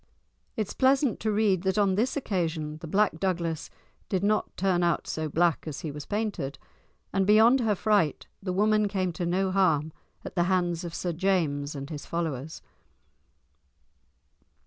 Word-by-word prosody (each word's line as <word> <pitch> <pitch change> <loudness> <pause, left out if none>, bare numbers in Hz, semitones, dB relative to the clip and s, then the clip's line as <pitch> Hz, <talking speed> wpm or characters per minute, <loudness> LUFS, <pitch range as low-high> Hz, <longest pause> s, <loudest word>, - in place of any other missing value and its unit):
It 215 - +1
is - - -7
pleasant 265 -2 +2
to 220 - 0
read 205 -4 +2
that 190 +2 0
on 200 -2 +3
this 235 +9 0
occasion 160 - -2
the 165 - -8
Black 195 -1 +1
Douglas 170 -4 -2 0.4
did 190 -1 0
not 215 +1 0
turn 185 -2 +1
out 170 -2 +1
so 155 -1 -3
black 170 +1 +1
as 145 -3 -5
he 155 - -4
was 150 0 -8
painted, 205 -10 -2 0.6
and 195 0 +1
beyond 225 +5 +6
her 220 -4 +1
fright 200 -7 +1 0.2
the 190 -2 -3
woman 210 +2 +3
came 185 -3 -1
to 170 +2 -3
no 190 +2 +1
harm 160 -5 +2 0.3
at - - -6
the 175 -2 +1
hands 175 -2 0
of 170 -1 -6
Sir 175 -2 -2
James 155 -6 0
and 140 +3 -6
his 150 -2 -7
followers. 160 -3 -4
185 Hz, 170 wpm, -27 LUFS, 160-205 Hz, 0.6 s, beyond